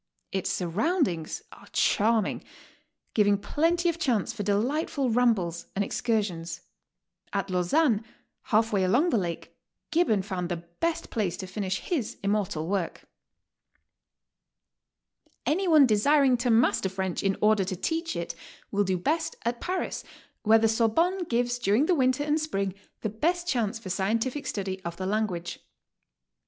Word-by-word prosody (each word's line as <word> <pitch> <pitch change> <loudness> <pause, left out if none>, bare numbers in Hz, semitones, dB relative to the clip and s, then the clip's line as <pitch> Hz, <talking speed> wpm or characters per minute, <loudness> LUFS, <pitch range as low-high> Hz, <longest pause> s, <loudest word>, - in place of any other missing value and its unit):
Its 190 -2 -1
surroundings 185 - -1
are - - -15
charming, 220 0 +2 0.7
giving 205 -2 +4
plenty 330 - +1
of 335 -1 0
chance 235 -6 0
for 230 - -5
delightful 250 - 0
rambles 205 -8 +1
and 200 +1 +1
excursions. 200 -9 -2 0.7
At 195 -1 -1
Lausanne, 210 - +2 0.4
half 220 0 +2
way 195 -2 +2
along 250 - +3
the 230 - +3
lake, 170 -3 -5 0.4
Gibbon 300 - +2
found 185 -3 -3
the 175 - -1 0.2
best 335 -1 -1
place 205 -7 -1
to 190 - -5
finisih 190 0 -3
his 295 - -2
immortal 200 -6 0
work. 190 -3 -2 2.4
Any 375 +5 +1
one 310 -4 +7
desiring 260 +4 +4
to 240 +1 -1
master 225 -4 +3
French 190 -1 -2
in 195 -1 0
order 210 -2 +4
to 185 0 -3
teach 325 - -2
it, 170 0 -3 0.4
will 205 0 +2
do 190 -2 0
best 315 - -1
at 235 0 -1
Paris, 370 +1 -2 0.4
where 220 +1 +6
the 225 0 +3
Sorbonne 325 - +2
gives 245 -2 0
during 225 +5 +3
the 360 - +3
winter 260 -2 +2
and 300 +1 +1
spring 195 -11 -1 0.3
the 215 - -1
best 345 - -1
chance 235 - 0
for 220 -5 -7
scientific 230 +9 -1
study 190 -2 -3
of 170 0 -5
the 185 - -4
language. 190 -4 -2
220 Hz, 145 wpm, -27 LUFS, 190-280 Hz, 2.4 s, one